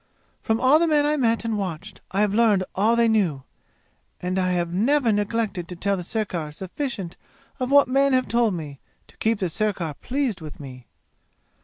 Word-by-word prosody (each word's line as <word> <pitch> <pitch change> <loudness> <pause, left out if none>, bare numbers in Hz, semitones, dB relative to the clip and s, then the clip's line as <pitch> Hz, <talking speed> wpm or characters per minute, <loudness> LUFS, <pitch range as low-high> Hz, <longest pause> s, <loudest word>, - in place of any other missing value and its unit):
"From 220 -1 0
all 260 +5 +5
the 335 - +2
men 300 -2 +3
I 300 +1 +2
met 230 -5 +1
and 220 -2 -1
watched 190 +1 -6
I 195 - 0
have 210 -1 +2
learned 215 -4 +3
all 215 +4 +2
they 235 0 +3
knew! 185 -12 +1 0.8
And 185 +1 -2
I 185 0 +1
have 175 -1 -1
never 240 +5 +2
neglected 205 -3 -1
to 180 - -7
tell 200 +3 0
the 185 - -4
sirkar 180 -6 -3
sufficient 190 - -5 0.4
of 255 -1 -2
what 280 0 +6
men 275 +2 +3
have 255 0 +2
told 235 -4 +1
me, 145 -5 -7 0.3
to - - -21
keep 225 0 +1
the 190 - -1
sirkar 180 -3 -2
pleased 250 - -2
with 155 -2 -9
me! 130 -3 -10
210 Hz, 190 wpm, -24 LUFS, 180-235 Hz, 0.8 s, what